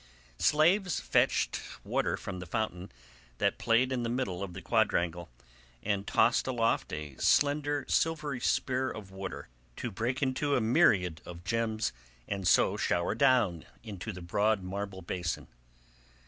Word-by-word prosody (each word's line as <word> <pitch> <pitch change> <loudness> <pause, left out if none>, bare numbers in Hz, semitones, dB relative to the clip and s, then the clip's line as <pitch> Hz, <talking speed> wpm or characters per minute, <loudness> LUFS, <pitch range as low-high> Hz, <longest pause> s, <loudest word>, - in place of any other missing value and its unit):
Slaves 175 +4 +3
fetched - - +1 0.2
water - - 0
from 90 -1 -6
the 90 - -8
fountain 95 -2 -3 0.5
that - - 0
played 120 +3 +3
in 130 -2 -1
the 115 - -2
middle 110 -7 -2
of 95 -3 -5
the 95 - -6
quadrangle 85 +1 +1 0.5
and 100 -1 -1
tossed 115 - +3
aloft 115 -3 0
a 75 -3 -6
slender 145 0 +2
silvery 150 -5 0
spear 130 +2 0
of 100 -3 -8
water 95 -1 -6 0.3
to - - -4
break 120 +7 -2
into 140 +2 +1
a - - +3
myriad 110 - +3 0.2
gems 110 - -1 0.3
and 100 -3 -2
so - - +4
shower 85 +2 0
down 115 - +3 0.2
into 105 0 -6
the 90 -3 -9
broad 100 +3 +1
marble 95 0 -5
basin. 85 -1 -3
110 Hz, 140 wpm, -30 LUFS, 95-130 Hz, 0.5 s, so